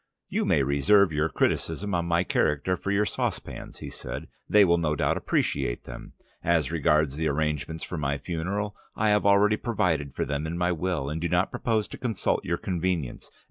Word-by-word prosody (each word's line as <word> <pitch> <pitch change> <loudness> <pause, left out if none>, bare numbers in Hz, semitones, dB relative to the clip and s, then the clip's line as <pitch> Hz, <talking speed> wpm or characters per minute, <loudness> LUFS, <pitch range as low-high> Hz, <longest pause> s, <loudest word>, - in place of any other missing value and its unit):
"You - - 0
may 70 - +3
reserve 80 +7 +4
your 75 +2 +1
criticism 100 +4 -1
on 85 -1 0
my 85 +1 +2
character 75 +1 +1
for 100 - -5
your 100 +1 +2
saucepans," - - -4
he - - -7
said. - - -7 0.2
"They 105 -1 +7
will 85 -1 +3
no 75 -2 0
doubt - - +1
appreciate - - -1
them. - - -10 0.3
As 80 -5 +2
regards 75 -2 +2
the 80 0 0
arrangements 75 +2 -1
for 85 - -4
my 70 -1 0
funeral, 100 +6 -3 0.2
I 110 0 +2
have 105 -1 +3
already 105 +1 +5
provided 90 - -1
for - - -1
them 75 +2 -2
in 85 +2 -3
my 90 0 +1
will, 85 -4 -1
and 75 +3 -3
do 85 - -1
not 90 +2 +2
propose 110 -3 0
to - - -8
consult 115 -6 0
your 85 - -1
convenience. 90 -7 -2
85 Hz, 190 wpm, -27 LUFS, 75-100 Hz, 0.3 s, They